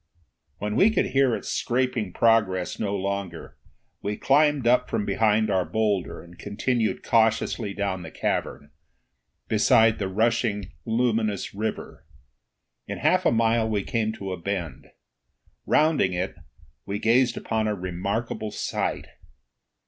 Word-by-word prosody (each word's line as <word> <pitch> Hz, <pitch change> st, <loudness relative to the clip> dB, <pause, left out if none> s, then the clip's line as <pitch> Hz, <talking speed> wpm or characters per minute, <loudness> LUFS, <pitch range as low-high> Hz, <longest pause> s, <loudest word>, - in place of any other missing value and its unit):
When 105 Hz, +1 st, -3 dB
we 205 Hz, -, +5 dB
could 220 Hz, -, 0 dB
hear 135 Hz, -3 st, +3 dB
its -, -, -6 dB
scraping 120 Hz, -5 st, -1 dB
progress 105 Hz, -5 st, +2 dB
no 100 Hz, -1 st, -1 dB
longer, 100 Hz, -3 st, -4 dB, 0.4 s
we 105 Hz, +1 st, -3 dB
climbed 145 Hz, -1 st, +3 dB
up 125 Hz, +1 st, +3 dB
from 105 Hz, -, -1 dB
behind 110 Hz, +1 st, +2 dB
our 95 Hz, -2 st, +2 dB
boulder 105 Hz, -2 st, -1 dB
and 85 Hz, 0 st, -16 dB
continued 110 Hz, +2 st, -1 dB
cautiously 110 Hz, -2 st, +1 dB
down 100 Hz, -3 st, -2 dB
the 80 Hz, -, -8 dB
cavern, 75 Hz, -2 st, -3 dB, 0.8 s
beside 110 Hz, 0 st, +4 dB
the 100 Hz, -, -1 dB
rushing 110 Hz, 0 st, 0 dB
luminous 110 Hz, -3 st, 0 dB
river. 110 Hz, +2 st, -5 dB, 0.8 s
In -, -, -4 dB
half -, -, +2 dB
a -, -, +4 dB
mile 115 Hz, 0 st, +2 dB
we 105 Hz, -2 st, 0 dB
came 110 Hz, 0 st, -1 dB
to 100 Hz, -3 st, -6 dB
a 90 Hz, -2 st, -5 dB
bend. 90 Hz, -3 st, -4 dB, 0.8 s
Rounding 150 Hz, -, +3 dB
it, 90 Hz, +2 st, -2 dB, 0.5 s
we 100 Hz, +1 st, -2 dB
gazed 120 Hz, +3 st, +2 dB
upon 110 Hz, -1 st, -1 dB
a 105 Hz, -, 0 dB
remarkable 100 Hz, +5 st, -3 dB
sight. -, -, -3 dB
110 Hz, 135 wpm, -25 LUFS, 100-115 Hz, 0.8 s, we